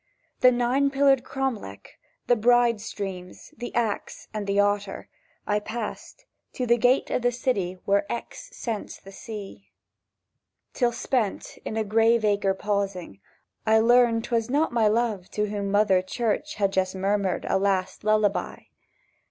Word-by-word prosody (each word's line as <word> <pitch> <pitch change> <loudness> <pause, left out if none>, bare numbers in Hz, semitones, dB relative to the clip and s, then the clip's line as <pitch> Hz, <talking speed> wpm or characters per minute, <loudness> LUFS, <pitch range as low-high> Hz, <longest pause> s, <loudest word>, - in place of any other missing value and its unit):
The 255 - +6
Nine 250 +3 +2
Pillared 275 -2 +3
Cromlech, 255 - -5 0.3
the 245 - +4
Bride 240 -1 +3
streams, 190 +4 -7
The 245 -3 -6
Axe, 230 -3 -2
and 210 -2 -4
the 200 0 +1
Otter 205 -1 0 0.4
I 210 0 +1
passed, 225 - -7 0.3
to 250 - -2
the 235 0 +3
gate 250 +3 +2
of - - 0
the 245 0 +2
city 200 -7 -1
Where 200 0 +1
Exe - - -6
scents 225 -4 -5
the 195 - -13
sea; 205 -2 -9 1.0
Till, 245 -2 +1
spent, 235 -3 -2
in - - -4
the 220 - 0
graveacre 215 -2 +2
pausing, 195 - -3 0.5
I 220 0 +5
learnt 230 0 +4
'twas 230 -1 -1
not 290 0 +1
my 225 -3 +3
Love 215 -4 0
To 210 0 -2
whom 200 -1 -3
Mother 205 -2 +3
Church 235 +9 -2
had 200 -2 0
just 190 0 0
murmured 195 -1 0
A - - +2
last 190 -1 -1
lullaby. 215 -1 +1
215 Hz, 145 wpm, -25 LUFS, 200-240 Hz, 1.0 s, The